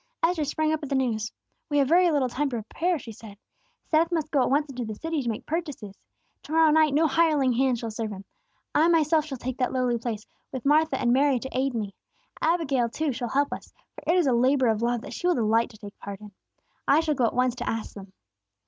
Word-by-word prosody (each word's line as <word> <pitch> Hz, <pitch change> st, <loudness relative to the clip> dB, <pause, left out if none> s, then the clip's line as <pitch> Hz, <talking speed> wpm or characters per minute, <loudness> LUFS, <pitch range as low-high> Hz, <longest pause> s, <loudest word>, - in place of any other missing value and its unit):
Esther 330 Hz, -2 st, +2 dB
sprang 310 Hz, +2 st, 0 dB
up 315 Hz, -, -2 dB
at 290 Hz, -, -6 dB
the 275 Hz, -, 0 dB
news. 225 Hz, -4 st, -1 dB, 0.4 s
"We 290 Hz, -, +1 dB
have 275 Hz, -2 st, +3 dB
very 350 Hz, +4 st, +5 dB
little 285 Hz, -5 st, +2 dB
time 275 Hz, +4 st, -1 dB
to 250 Hz, -, -4 dB
prepare," 330 Hz, -, -1 dB
she 235 Hz, -5 st, -9 dB
said. 210 Hz, -1 st, -12 dB, 0.5 s
"Seth 325 Hz, +2 st, +2 dB
must 315 Hz, -3 st, -1 dB
go 280 Hz, -, +3 dB
at -, -, +1 dB
once 290 Hz, +3 st, +2 dB
into 255 Hz, -3 st, -5 dB
the 215 Hz, -2 st, -5 dB
city 325 Hz, +5 st, -2 dB
to 240 Hz, -, -2 dB
make 220 Hz, -, -4 dB
purchases. 295 Hz, -, -4 dB, 0.5 s
To -, -, -12 dB
morrow 320 Hz, -1 st, +5 dB
night, 305 Hz, -2 st, +4 dB
no 320 Hz, +2 st, +4 dB
hireling 300 Hz, -4 st, +3 dB
hand 255 Hz, 0 st, +2 dB
shall 230 Hz, -1 st, -5 dB
serve 220 Hz, 0 st, -4 dB
him. 195 Hz, -1 st, -8 dB, 0.5 s
I 315 Hz, +2 st, +4 dB
myself 320 Hz, -2 st, +3 dB
shall 275 Hz, -4 st, -6 dB
take 255 Hz, +1 st, -5 dB
that 255 Hz, -, +1 dB
lowly 250 Hz, -2 st, +1 dB
place, 225 Hz, -2 st, -4 dB, 0.3 s
with 260 Hz, -2 st, -6 dB
Martha 300 Hz, -1 st, +3 dB
and 240 Hz, 0 st, +2 dB
Mary 275 Hz, 0 st, +3 dB
to 265 Hz, +2 st, -7 dB
aid 260 Hz, 0 st, 0 dB
me. 205 Hz, -3 st, -3 dB, 0.5 s
Abigail, 290 Hz, -8 st, +1 dB
too, 305 Hz, +4 st, -1 dB
shall 240 Hz, 0 st, -4 dB
help 285 Hz, +3 st, +1 dB
us, -, -, -9 dB, 0.2 s
for -, -, -12 dB
it 360 Hz, -, +3 dB
is 350 Hz, -, +3 dB
a 260 Hz, -, +3 dB
labor 255 Hz, +1 st, +3 dB
of 220 Hz, 0 st, 0 dB
love 240 Hz, 0 st, 0 dB
that -, -, -9 dB
she 355 Hz, -, -2 dB
will 355 Hz, -, +3 dB
delight 225 Hz, -1 st, +2 dB
to 215 Hz, -, -15 dB
take 205 Hz, -1 st, -11 dB
part 200 Hz, -1 st, -7 dB
in. 210 Hz, -1 st, -12 dB, 0.6 s
I 295 Hz, +3 st, +5 dB
shall 315 Hz, -2 st, 0 dB
go 255 Hz, -4 st, +2 dB
at -, -, -4 dB
once 250 Hz, 0 st, +2 dB
to -, -, -3 dB
ask 225 Hz, -1 st, -4 dB
them." 195 Hz, -2 st, -11 dB
265 Hz, 245 wpm, -26 LUFS, 235-310 Hz, 0.6 s, very